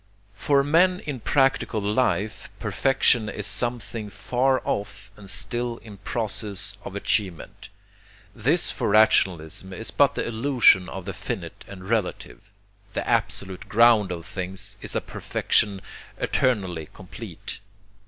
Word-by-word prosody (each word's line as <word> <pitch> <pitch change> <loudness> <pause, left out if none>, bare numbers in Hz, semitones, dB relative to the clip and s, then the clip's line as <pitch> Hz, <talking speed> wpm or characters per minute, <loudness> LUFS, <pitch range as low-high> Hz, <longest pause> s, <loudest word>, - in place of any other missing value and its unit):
For 140 +6 +2
men 180 +5 +4
in 145 -4 -5
practical 135 -3 +1
life 105 -1 0
perfection 125 -4 +2
is 105 - -4
something 115 -1 -1
far 125 +6 +1
off 100 0 -4
and 100 -2 -10
still 120 +3 -1
in 105 -4 -12
process 100 -1 -4
of 95 - -8
achievement. 100 -3 -2 0.7
This 145 +10 +2
for - - -2
rationalism 95 -4 +3
is 110 +4 -3
but 140 -2 +3
the - - -1
illusion 115 -6 +4
of 95 -2 -7
the 100 - -4
finite 95 -4 -6
and 95 -1 -10
relative: 110 -4 -2 0.5
the - - -3
absolute 95 -2 -1
ground 110 -3 +5
of 85 -1 -5
things 95 +2 -4
is - - -1
a - - +1
perfection 100 -2 0 0.3
eternally 95 - 0
complete. - - -8
105 Hz, 125 wpm, -25 LUFS, 95-120 Hz, 0.7 s, ground